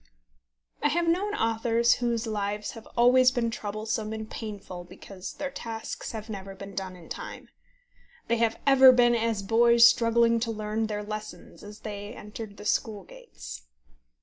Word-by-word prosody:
I - - +3
have 335 +3 0
known 395 +5 +1
authors 230 - +2
whose 235 -2 0
lives 210 -1 -3
have 225 -2 -12
always 250 +2 +6
been 240 -3 -1
troublesome 215 +1 -3
and 220 0 -5
painful 200 -5 -7
because 185 +1 -9
their 280 -1 -4
tasks 225 -4 -6
have 220 -1 -7
never 195 -2 -7
been 195 +1 -9
done 190 -1 -5
in 175 -2 -14
time. - - -8 0.8
They 235 - +2
have 225 -1 +1
ever 265 -1 +8
been 245 -1 +4
as 225 -3 0
boys 235 +3 +6
struggling 230 0 +3
to 230 0 -2
learn 215 0 -2
their 210 -1 -3
lesson 215 +1 -7
as 210 +1 -11
they 205 +1 -7
entered 210 -1 -9
the - - -10
school 210 -3 -1
gates. - - -11
220 Hz, 160 wpm, -27 LUFS, 205-235 Hz, 0.8 s, ever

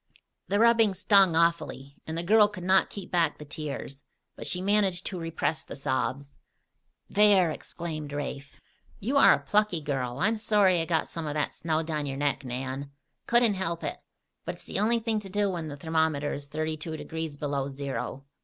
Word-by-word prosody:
"The 205 - +1
rubbing 230 -3 +5
stung 195 -2 +5
awfully, 160 -4 0
and 160 +1 -4
the 170 - -2
girl 210 +3 +6
could 205 -4 -9
not 190 +1 +4
keep 200 -3 -8
back 165 -4 +2
the 150 - -10
tears; 145 -2 -6 0.3
but - - -5
she 180 - 0
managed 195 -2 +2
to 185 - -3
repress 165 -1 -2
the - - -9
sobs. 135 0 -3 0.7
"There!" 200 -5 +5
exclaimed 155 -2 -6
Rafe. 140 -1 -6 0.4
"You 255 +8 0
are - - +8
a - - +5
plucky 210 -5 +1
girl. 135 -5 -3
I'm 215 +8 +1
sorry 205 -5 +3
I - - -2
got 165 -1 0
some 165 -2 -5
of 145 - -3
that 150 - -1
snow 160 0 -1
down 155 -2 -3
your 135 -1 -4
neck, 145 -1 0
Nan. 130 +2 -4 0.4
Couldn't 240 -2 +4
help 170 -3 -3
it. - - -4 0.4
But - - -4
it's - - -14
the - - -2
only 225 +3 +3
thing 225 -1 -1
to 200 -2 -10
do 205 0 +1
when 170 -3 -4
the 145 -1 -7
thermometer 160 -1 0
is 140 0 -6
thirty 155 +2 -3
two 160 +1 -5
degrees 160 -2 -5
below 140 -2 -2
zero. 135 -1 -5
165 Hz, 190 wpm, -28 LUFS, 145-195 Hz, 0.7 s, are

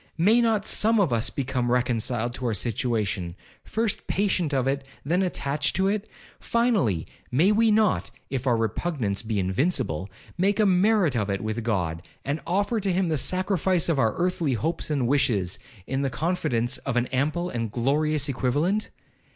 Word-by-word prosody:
May 215 +8 +4
not 220 -3 +1
some 225 +1 +2
of 175 -11 +2
us 115 -1 +1
become 125 -3 -2
reconciled 120 -1 0
to 125 0 -3
our 110 - 0
situation—first 110 - -2
patient 185 -6 +1
of 135 -2 +1
it, 135 0 0 0.2
then 175 +6 +1
attached 145 -5 -1
to 190 +2 +2
it? 210 +1 -2 0.3
Finally, 200 - +1 0.3
may 165 +11 +4
we 225 +1 +4
not 215 -1 +2 0.2
(if 135 -1 -2
our 120 -2 +3
repugnance 115 - -1
be 110 -2 -3
invincible) 95 - 0 0.3
make 195 +2 +2
a 215 - +5
merit 190 - +3
of 105 -3 0
it 100 -1 -1
with 110 +2 -3
God 90 -8 -1 0.2
and 145 +3 -2
offer 205 +6 +1
to 195 -2 0
him 180 -1 +1
the 160 - +1
sacrifice 185 +2 +1
of 155 -5 +1
our 110 -3 +2
earthly 175 -5 0
hopes 160 +9 -2
and 140 -5 0
wishes, 110 -9 +1 0.3
in 135 +1 -2
the 135 - 0
confidence 130 -6 -1
of 135 - -3
an 120 0 +2
ample 155 +7 0
and 115 -3 -3
glorious 145 +5 +1
equivalent? 145 - 0
140 Hz, 165 wpm, -25 LUFS, 120-185 Hz, 0.3 s, a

